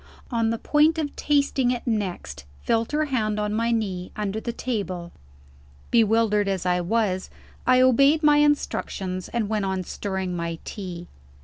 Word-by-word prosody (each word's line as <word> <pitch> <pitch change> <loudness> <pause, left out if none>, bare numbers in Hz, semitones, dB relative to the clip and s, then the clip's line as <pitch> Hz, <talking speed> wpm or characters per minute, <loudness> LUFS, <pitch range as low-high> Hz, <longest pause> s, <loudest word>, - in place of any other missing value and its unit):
On 230 -2 +1
the 230 - -1
point 305 +6 +3
of 300 -3 -3
tasting 280 -3 +1
it 245 -1 -2
next, 180 - -3 0.2
felt 230 0 0
her 305 +1 +1
hand 215 -7 -1
on 210 0 -1
my 230 +2 0
knee, 190 -6 -2
under 210 0 -2
the 235 - -4
table. 190 -8 -4 0.8
Bewildered 220 -2 +3
as 190 -2 -1
I 180 0 +2
was, 190 0 0 0.4
I 255 0 +5
obeyed 275 +5 +4
my 295 -1 +6
instructions, 195 -10 0
and 235 -3 -1
went 210 -2 -1
on 190 -1 -1
stirring 190 -1 -4
my 170 -1 -3
tea. 175 -4 -7
215 Hz, 155 wpm, -24 LUFS, 185-250 Hz, 0.8 s, my